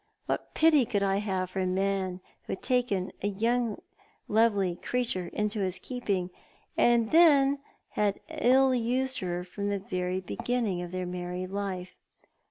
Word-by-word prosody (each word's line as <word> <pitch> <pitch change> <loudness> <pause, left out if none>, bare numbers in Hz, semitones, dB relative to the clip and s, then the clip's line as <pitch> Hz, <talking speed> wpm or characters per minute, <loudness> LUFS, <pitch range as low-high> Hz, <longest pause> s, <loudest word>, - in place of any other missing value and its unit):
What - - -3
pity 315 -4 +5
could 205 -3 0
I 195 0 +2
have 190 -3 -2
for 195 - -3
a 185 - +1
man 190 -1 -1 0.2
who - - -3
had 190 - -7
taken 240 -7 0
a 205 - +2 1.0
lovely 210 -3 +3
young 175 - -5
creature 235 -8 -1
into 210 0 -2
his 185 -2 0
keeping, 195 -7 -2 0.4
and 235 -2 +3 0.8
had 205 -1 0
ill 260 +2 +4
used 255 +2 0
her 180 -2 -3
from 200 +3 -4
the 200 - 0
very 185 -1 -2
beginning 190 - -2
of 175 -1 -6
their 185 0 -3
married 180 +1 -4
life? 190 -2 -4
195 Hz, 150 wpm, -29 LUFS, 185-230 Hz, 1.0 s, pity